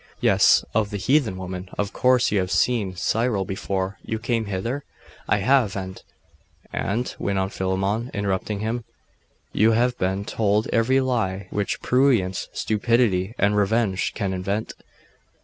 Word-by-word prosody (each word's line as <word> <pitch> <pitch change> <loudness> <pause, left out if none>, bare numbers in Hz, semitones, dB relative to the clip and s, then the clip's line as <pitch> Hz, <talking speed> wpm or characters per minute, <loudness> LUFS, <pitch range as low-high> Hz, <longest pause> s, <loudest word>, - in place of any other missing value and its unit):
'Yes, - - +4
of 105 -1 +1
the 105 - -4
heathen 120 -2 +1
woman. 90 0 -6
Of 100 -1 -2
course 125 -1 +3
you 100 - +2
have 90 -1 -1
seen 105 -4 +1
Cyril 110 +1 0
before 95 0 -3
you 110 - -3
came 115 0 -1
hither?' 115 +8 -3 0.5
'I 105 - +4
have, 110 0 +2
and 95 -1 -6 0.4
' - - -33
'And,' 115 +5 -2
went 100 -1 -1
on 95 0 0
Philammon, 95 +5 -1
interrupting 100 +1 -2
him, 115 +2 -2 0.7
'you 110 +2 +4
have 120 +2 +2
been 95 +2 -1
told 105 0 +1
every 130 +4 +3
lie 100 -7 -1
which 105 -1 -2
prurience, 125 -8 +2
stupidity, 110 -2 +1
and 100 +1 +2
revenge 105 -1 +1
can 100 -3 -2
invent. 100 +4 -3
105 Hz, 150 wpm, -23 LUFS, 95-115 Hz, 0.7 s, Yes